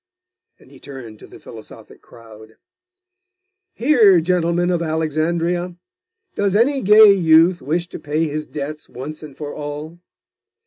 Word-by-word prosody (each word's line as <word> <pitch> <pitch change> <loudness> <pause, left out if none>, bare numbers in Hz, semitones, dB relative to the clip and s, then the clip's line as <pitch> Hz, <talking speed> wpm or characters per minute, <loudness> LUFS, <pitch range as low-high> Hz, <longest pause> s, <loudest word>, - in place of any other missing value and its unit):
And - - -22
he - - -16
turned 120 -6 -11
to - - -14
the - - -15
philosophic - - -14
crowd. 110 -1 -17 1.2
'Here, 225 - +4
gentlemen 175 +1 0
of 175 -1 -1
Alexandria! 165 +2 -2 0.6
Does 200 -1 -1
any 270 +5 +2
gay 210 +1 +7
youth 170 -1 +3
wish 170 +6 -2
to - - -9
pay 155 +2 -2
his 150 +1 -5
debts 150 +1 -7
once 150 +5 -9
and 150 -3 -12
for 145 -1 -7
all? 150 +3 -8
160 Hz, 135 wpm, -19 LUFS, 150-180 Hz, 1.2 s, gay